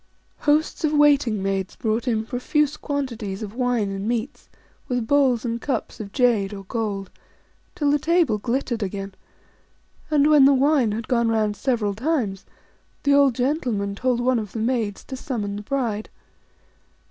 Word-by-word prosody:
Hosts 300 +2 +1
of 310 -1 +1
waiting 280 -9 +3
maids 195 -1 -2
brought 225 +2 -1
in 220 -2 0
profuse 290 +5 0
quantities 235 -10 -4
of 205 -1 -7
wine 245 -4 0
and 195 +1 -4
meats, 240 +4 -3 0.4
with 245 -2 -1
bowls 260 -2 +2
and 235 0 -2
cups 275 - -3
of 205 -2 -7
jade 215 -6 +2
or 195 - -8
gold, 200 -2 -3 0.6
till 295 -5 +1
the 295 - +2
table 320 -8 +2
glittered 240 0 -2
again. 195 0 -4 1.0
And 295 -2 +3
when 300 -3 +7
the 275 0 +6
wine 270 -4 +3
had 220 +2 -4
gone 235 -2 +2
round 215 -2 +1
several 225 -5 0
times, 225 -5 -2 0.6
the 280 - +3
old 280 -3 +5
gentleman 245 -7 -1
told 245 +4 0
one 250 -1 +2
of 210 -3 -7
the - - -5
maids 225 -3 -1
to 265 - -7
summon 230 -7 -4
the 205 - -5
bride. 220 -3 -2
235 Hz, 160 wpm, -23 LUFS, 210-275 Hz, 1.0 s, when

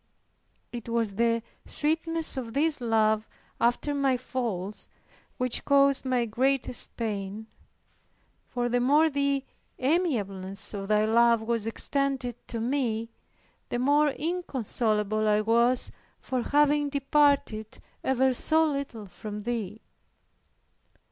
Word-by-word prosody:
It 235 -1 -7
was 230 -3 0
the 230 +2 +1 0.2
sweetness 325 +1 0
of 240 -4 -5
this 300 -1 +1
love 220 -2 +2 0.3
after 245 +5 +1
my 275 -2 +1
falls 225 -6 -4 0.5
which 250 -1 -1
caused 275 -1 +3
my 250 -2 +1
greatest 255 +3 0
pain; 210 -1 -4 1.0
for 245 -1 -2
the 245 +1 +1
more 295 +6 +4
the 280 -1 0 0.3
amiableness 215 - 0
of 195 -1 -5
Thy 210 0 +3
love 230 0 +4
was 225 -1 -1
extended 270 +1 -1
to 230 - -4
me, 230 -2 -1 0.6
the - - -1
more 290 +4 +3
inconsolable 230 - -1
I 210 0 +3
was 235 +3 +3 0.3
for 255 -2 -2
having 290 +2 +2
departed 280 -6 +1 0.3
ever 265 0 +2
so 320 +5 +2
little 275 -7 -3
from 205 +3 -7
Thee. 220 -2 -4
240 Hz, 115 wpm, -27 LUFS, 220-280 Hz, 1.0 s, more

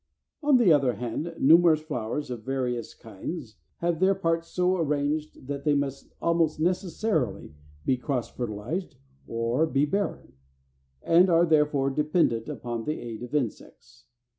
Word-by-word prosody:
On 290 -3 +5
the 210 -9 +6
other 135 -4 +3
hand, 125 +9 -4
numerous 165 +2 +6
flowers, 145 -2 -4
of 120 -3 -5
very 130 +1 -1
various 120 -2 -5
kinds, 115 - -7 0.2
have 170 -1 0
their 190 +1 +4
parts 165 -3 -1
so 180 +1 +1
arranged 150 -2 -1
that 140 +1 -5
they 150 -2 +3
must 140 -1 -3
almost 165 -2 +1
necessarily 175 - -1 0.3
be 130 - +2
cross 125 -2 -2
fertilized 125 - -4 0.3
or 115 +7 0
be 140 -1 +2
barren, 200 +7 -3 0.7
and 175 +3 +5
are 170 0 +5
therefore 150 -4 +2
dependent 150 -6 +1
upon 120 -2 -5
the 155 - -2
aid 115 -2 -7
of 125 +4 -6
insects. 115 - -5
150 Hz, 145 wpm, -27 LUFS, 125-170 Hz, 0.7 s, the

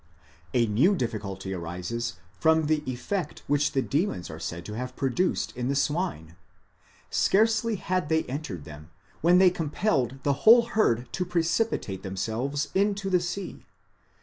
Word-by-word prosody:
A 120 -1 +4
new 130 - +3
difficulty 100 - -4
arises 90 +6 -4 0.2
from 160 -1 +4
the 155 0 +1
effect 160 +6 -4
which 145 +1 +1
the 135 -2 +1
demons 145 - -1
are 80 - -8
said 85 +1 -5
to 105 - -6
have 125 +3 -5
produced 135 +8 0
in 125 0 -2
the 140 - 0
swine. 145 - -1 0.8
Scarcely 220 +2 +3
had 185 -4 -2
they 160 0 +2
entered 125 - -5
them, 75 +1 -11 0.3
when 175 +3 +5
they 185 -1 +6
compelled 150 - 0
the 140 - +2
whole 235 +2 +8
herd 125 - +1
to 180 - 0
precipitate 170 - -1
themselves 110 +10 -2
into 200 0 +1
the 180 - +4
sea. 175 +3 -5
145 Hz, 150 wpm, -27 LUFS, 110-180 Hz, 0.8 s, whole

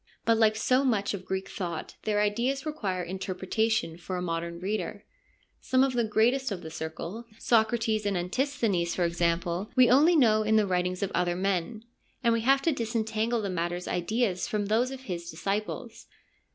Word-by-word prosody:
But, 230 -1 +3
like 215 -1 +4
so 255 +5 +2
much 215 -7 +1
of 190 -2 -6
Greek 190 0 -2
thought, 170 -4 -5
their 210 -1 +2
ideas 240 +7 0
require 200 - -2
interpretation 190 0 -1
for 185 +1 -4
a - - -3
modern 170 0 -3
reader. 205 +4 -3 0.5
Some 260 0 +2
of 270 -1 +1
the 240 -1 +1
greatest 235 +4 +2
of 180 -3 -4
the 160 - -7
Circle, 165 +8 -6
Socrates 220 -2 +2
and 200 -2 0
Antisthenes, 190 -3 0
for 180 - +1
example, 170 +2 0
we 250 -2 +6
only 305 +7 +6
know 220 -7 +5
in 215 0 +2
the 215 -1 +4
writings 180 0 -1
of 195 - -2
other 175 0 +1
men, 195 +3 -1 0.4
and 235 -1 +4
we 230 - +1
have 270 +3 +3
to 330 - +3
disentangle 225 -2 -1
the 200 - -2
master's 175 0 -2
ideas 185 +1 0
from 210 -1 -1
those 225 +5 +2
of 265 -1 -7
his 175 -8 -5
disciples. 195 +6 -4
210 Hz, 180 wpm, -28 LUFS, 180-235 Hz, 0.5 s, we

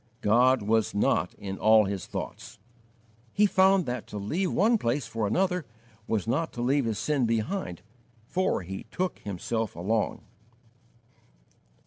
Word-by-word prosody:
"God 120 +3 +4
was 110 0 +1
not 90 -4 +1
in 95 -1 -6
all 110 0 +6
his 100 -1 -4
thoughts." - - -7 0.8
He 210 - +4
found 190 -2 +4
that 125 -2 -4
to 105 - -7
leave 165 - -1
one 225 +3 +3
place 125 0 -1
for 110 -2 -2
another 180 - +1 0.4
was 110 -4 0
not 145 +8 -1
to 120 - -5
leave 135 +1 +2
his 110 -3 -1
sin 140 -2 0
behind, 115 - -2 0.4
for 175 - 0
he 95 +2 -7
took 185 0 -2
himself 105 +3 -3
along. 105 +6 -1
115 Hz, 140 wpm, -27 LUFS, 105-165 Hz, 0.8 s, all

